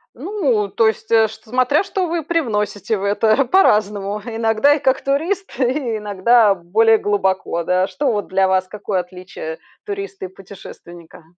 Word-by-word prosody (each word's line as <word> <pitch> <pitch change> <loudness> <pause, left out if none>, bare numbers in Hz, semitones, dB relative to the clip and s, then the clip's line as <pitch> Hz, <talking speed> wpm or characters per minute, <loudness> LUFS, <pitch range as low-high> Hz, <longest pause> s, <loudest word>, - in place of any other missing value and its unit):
Ну, 270 - -1
то 225 +3 +2
есть, 220 0 -3
э, 225 -1 +5
чт 220 - -13
смотря, 255 - +1
что 385 -2 -2
вы 335 -1 -2
привносите 220 - -1
в 195 - -6
это. 215 +6 +2
По-разному. 210 - +2
Иногда 225 +4 +2
и 295 - -1
как 265 -2 +1
турист, 335 +9 -1
и 255 -3 0
иногда 210 +1 +3
более 220 +6 +3
глубоко, 190 -4 -1
да. 185 +2 +1
Что 280 +3 -1
вот 205 -2 -2
для 190 0 +2
вас, 185 0 +1
какое 205 -2 -3
отличие 180 -3 -9 0.3
туриста 195 -1 -6
и - - -5
путешественника? 175 -3 -13
215 Hz, 160 wpm, -19 LUFS, 195-255 Hz, 0.3 s, э